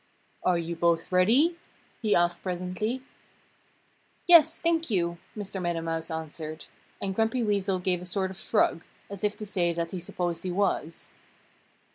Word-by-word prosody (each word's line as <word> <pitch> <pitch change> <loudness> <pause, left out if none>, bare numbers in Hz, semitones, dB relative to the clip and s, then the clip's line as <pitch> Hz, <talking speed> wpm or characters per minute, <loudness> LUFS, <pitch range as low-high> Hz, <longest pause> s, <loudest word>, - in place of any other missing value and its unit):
"Are 180 -1 +2
you 170 0 -3
both 170 0 +1
ready?" 245 - +4 0.4
he 215 -3 +2
asked 175 0 +2
presently. 185 +7 -3 1.2
"Yes, 330 -2 +7
thank 330 -2 +1
you!" 170 -4 0 0.2
Mr. 200 -2 -5
Meadow 175 -1 -1
Mouse 165 0 -3
answered. 160 -1 -6 0.3
And 195 -1 -2
Grumpy 225 +4 +1
Weasel 200 -3 +1
gave 180 -1 0
a - - -7
sort 190 +1 -1
of 190 - -10
shrug, 165 - +1 0.3
as 200 -1 -7
if 210 0 0
to 215 - -5
say 180 -4 +1
that 170 0 -3
he 185 - -4
supposed 175 0 -3
he 185 - -2
was. 175 -4 -1
180 Hz, 155 wpm, -28 LUFS, 170-210 Hz, 1.2 s, Yes